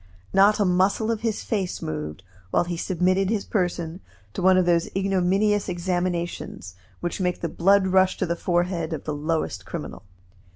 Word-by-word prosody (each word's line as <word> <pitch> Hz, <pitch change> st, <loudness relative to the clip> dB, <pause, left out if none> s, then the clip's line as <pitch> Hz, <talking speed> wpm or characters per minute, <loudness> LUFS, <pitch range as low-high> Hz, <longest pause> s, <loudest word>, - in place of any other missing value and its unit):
Not 200 Hz, +2 st, +5 dB
a 205 Hz, -, +3 dB
muscle 190 Hz, +5 st, +2 dB
of 225 Hz, -1 st, -2 dB
his 225 Hz, -2 st, -2 dB
face 195 Hz, -6 st, -2 dB
moved 75 Hz, +2 st, -5 dB, 0.3 s
while -, -, +2 dB
he 175 Hz, 0 st, -4 dB
submitted 185 Hz, +2 st, +1 dB
his 215 Hz, -2 st, -1 dB
person 175 Hz, -3 st, -2 dB, 0.3 s
to -, -, -4 dB
one 185 Hz, +1 st, +5 dB
of 185 Hz, -, +3 dB
those 170 Hz, -1 st, +2 dB
ignominous 195 Hz, +2 st, +1 dB
examinations 175 Hz, -, -3 dB, 0.3 s
which 175 Hz, +2 st, -3 dB
make 180 Hz, -1 st, -1 dB
the 170 Hz, -, -1 dB
blood 195 Hz, +4 st, +3 dB
rush 190 Hz, 0 st, +3 dB
to 190 Hz, -, 0 dB
the 170 Hz, -1 st, -1 dB
forehead 175 Hz, -2 st, -1 dB
of 155 Hz, -, -5 dB
the 155 Hz, -, -3 dB
lowest 155 Hz, +2 st, -2 dB
criminal. -, -, -7 dB
180 Hz, 170 wpm, -24 LUFS, 170-195 Hz, 0.3 s, Not